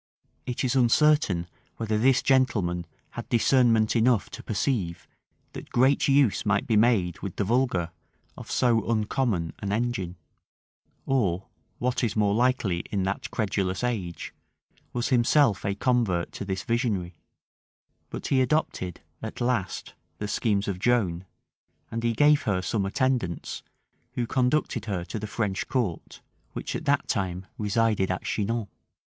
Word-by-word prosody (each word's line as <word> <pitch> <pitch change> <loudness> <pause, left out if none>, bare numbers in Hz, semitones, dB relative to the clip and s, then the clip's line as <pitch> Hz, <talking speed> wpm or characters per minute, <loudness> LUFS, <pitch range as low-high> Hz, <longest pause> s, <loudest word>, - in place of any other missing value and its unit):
It 125 +1 -2
is 130 0 +1
uncertain 125 - +3 0.3
whether 110 -1 -1
this 125 +4 +3
gentleman 105 -11 +1 0.2
had - - -7
discernment 115 -2 +3
enough 115 -2 +2
to - - -8
perceive, 100 -6 -2 0.5
that - - -9
great 130 +3 +3
use 135 -5 +3
might 105 +3 +1
be 115 -6 +1
made 105 -6 +3
with 95 -3 -6
the - - 0
vulgar 105 -6 +1 0.4
of - - -10
so 115 -3 +2
uncommon 110 - 0
an 100 - -3
engine; 105 -5 -1 0.9
or, 100 -9 +1 0.3
what 125 +1 -1
is 110 -3 0
more 105 -2 +2
likely 115 -6 +1
in 100 -2 -1
that 95 +1 -2
credulous 95 -2 -1
age, 100 -9 -3 0.6
was 120 +1 -2
himself 125 -3 +3
a 100 0 -1
convert 110 -7 +1
to - - -6
this 95 -1 -3
visionary; 110 -7 -1 1.0
but - - -6
he 130 -1 +2
adopted 130 - -1 0.2
at - - -6
last 120 -6 -1 0.2
the 105 - -4
schemes 105 -1 0
of 95 -3 -2
Joan; 95 -6 +1 0.7
and 115 - -2
he 115 0 +2
gave 145 +5 +4
her 95 -3 -1
some 100 +1 -1
attendants, 120 - -1 0.5
who 120 - -1
conducted 125 -2 0
her 95 -5 -3
to 110 - -5
the 110 - -5
French 105 -3 -2
court, 110 -11 -3 0.3
which - - -4
at - - -4
that 145 0 +2
time 95 -2 -2
resided 105 -2 +1
at 90 - -2
Chinon. 110 +1 -1
110 Hz, 145 wpm, -26 LUFS, 95-125 Hz, 1.0 s, gave